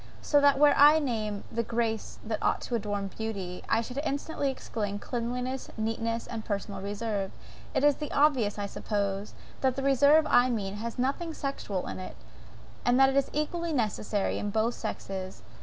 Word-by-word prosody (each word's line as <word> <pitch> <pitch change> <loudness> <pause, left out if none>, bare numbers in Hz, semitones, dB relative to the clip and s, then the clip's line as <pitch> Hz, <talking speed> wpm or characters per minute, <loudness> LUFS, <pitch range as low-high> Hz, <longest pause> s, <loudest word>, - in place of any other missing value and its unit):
So 290 -1 +3
that 285 -1 +5
were 295 +1 +6
I 295 +2 +8
to 310 - 0
name 215 -5 -2
the 235 0 0
graces 230 -1 -2
that 215 -1 -2
ought - - +2
to - - -6
adorn 205 -3 -2
beauty, 195 -5 -4
I 225 - +3
should 250 +4 -5
instantly 285 0 -1
exclaim, 210 -6 -3
cleanliness, 250 +3 -3
neatness, 225 +1 -1
and 225 -2 -5
personal 200 -2 -3
reserve. 205 -1 -2 0.5
It - - +2
is 290 -1 +5
obvious, 265 -9 +3
I 205 - -2
suppose, 200 0 -2 0.3
that 260 -2 +2
the 270 - -3
reserve 280 +3 +5
I 245 +1 +5
mean, 205 -4 -2
has 230 +3 -5
nothing 285 +6 -1
sexual 210 -9 -3
in - - -5
it, 185 - -7 0.7
and 245 +1 +3
that 270 0 +6
I 275 - +6
think - - -12
it 295 - -2
EQUALLY 340 +1 -3
necessary 215 -4 0
in 205 - -2
both 220 +3 +1
sexes. 190 -4 -5
230 Hz, 180 wpm, -29 LUFS, 205-270 Hz, 0.7 s, I